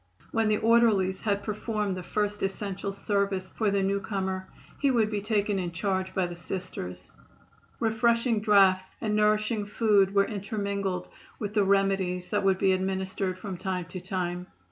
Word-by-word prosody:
When 225 -1 +2
the 210 - +3
orderlies 220 -5 +3
had 200 -2 0
performed 210 -2 -2
the 185 - -5
first 205 +3 -2
essential 195 0 -3
service 195 -1 -1
for 215 -2 0
the 200 -1 +1
newcomer 190 -1 -2 0.3
he 280 - +3
would 225 -4 +2
be 205 -1 -1
taken 205 -1 0
in 175 -2 -3
charge 190 +2 -2
by 190 - +2
the 175 0 -6
Sisters. 160 - -6 0.7
Refreshing 230 +1 +2
draughts 195 -3 +4
and 215 -2 -1
nourishing 215 +1 +2
food 205 -2 +3
were 200 0 +5
intermingled 200 -3 -3 0.3
with 210 -2 -4
the 210 -2 +3
remedies 195 -2 +1
that 210 - +1
would 190 -1 +3
be 190 0 +3
administered 190 0 -1
from 190 -1 -6
time 185 -1 -3
to 185 0 -6
time. 180 -1 -3
200 Hz, 160 wpm, -28 LUFS, 185-210 Hz, 0.7 s, were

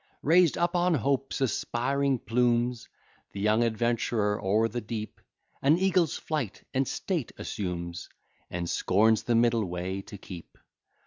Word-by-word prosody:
Raised 170 +1 +4
up 175 +1 +1
on 175 -1 +3
Hope's 135 +2 -1
aspiring 135 +3 0
plumes, 120 0 0 0.4
The 100 - -6
young 105 +3 +3
adventurer 115 -2 0
o'er 105 +4 +3
the 120 +1 -4
deep 110 -1 -6 0.4
An 145 +4 +4
eagle's 180 -4 +2
flight 135 -11 -4
and 135 +1 +1
state 170 - -2
assumes, 85 -3 -5 0.4
And 85 0 -3
scorns 110 +6 +3
the 120 - 0
middle 115 -1 +3
way 90 +1 -4
to 100 - -10
keep. 90 -3 -11
115 Hz, 135 wpm, -28 LUFS, 105-135 Hz, 0.4 s, Raised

